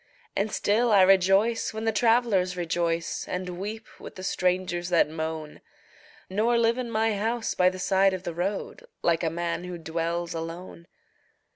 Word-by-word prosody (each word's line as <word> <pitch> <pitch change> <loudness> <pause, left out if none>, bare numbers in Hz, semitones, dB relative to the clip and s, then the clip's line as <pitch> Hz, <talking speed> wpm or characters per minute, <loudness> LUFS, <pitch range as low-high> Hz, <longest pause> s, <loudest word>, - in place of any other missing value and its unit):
And 205 +1 0
still 225 +5 +2
I 200 -3 +7
rejoice 195 +5 +3
when 220 +1 -4
the 225 - +3
travelers 220 -5 +2
rejoice 170 0 -1
And 180 -1 -4
weep 215 +3 -5
with - - -10
the 185 - -8
strangers 180 -2 0
that 170 -3 +4
moan, 160 -1 -5 0.7
Nor 220 +5 +1
live 235 +1 +2
in 245 -2 -3
my 220 -1 +1
house 225 +3 -1
by 180 0 +4
the 185 - -7
side 190 +1 +3
of 185 - -8
the 170 - -4
road 195 - -4 0.2
Like 170 0 +2
a 165 - +2
man 170 +1 -3
who 180 -1 -6
dwells 170 +1 -3
alone. 170 +1 -7
185 Hz, 165 wpm, -26 LUFS, 170-215 Hz, 0.7 s, I